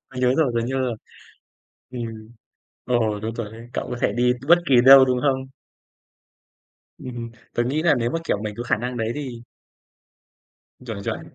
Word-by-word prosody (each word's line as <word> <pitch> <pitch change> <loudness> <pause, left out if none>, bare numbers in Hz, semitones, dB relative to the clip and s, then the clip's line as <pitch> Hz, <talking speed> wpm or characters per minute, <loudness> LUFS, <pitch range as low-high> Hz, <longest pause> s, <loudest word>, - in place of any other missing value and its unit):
Tớ 130 - -13
nhớ 125 +1 +3
rồi, 150 -6 +2
tớ 115 - +1
nhớ 130 +1 -2
rồi. 125 -3 -1 1.0
Ừm. 115 -3 -7 0.6
Ồ, 110 -4 0
đúng 110 +2 -4
rồi 110 -2 -5
đấy, 115 +2 -12
cậu - - -3
có 125 - -4
thể - - +2
đi 125 +2 +2
t 125 +2 -11
bất 170 +2 +7
kỳ 135 - +5
đâu 135 0 +10
đúng 125 -1 0
hông? 130 -1 0 1.5
Ừm, 130 -1 -8
ừm, 115 -1 -6 0.2
tớ 120 - +1
nghĩ 145 +6 -1
là 160 -3 +4
nếu 120 -2 -1
mà, 165 - -1
kiểu, 155 - 0
mình 105 -1 -4
có 120 - -4
khả 120 - +1
năng 125 +3 -4
đấy 115 0 -1
thì 130 -5 -6 1.4
Chuẩn, 110 -4 -5
chuẩn. - - -3
125 Hz, 195 wpm, -23 LUFS, 115-130 Hz, 1.5 s, đâu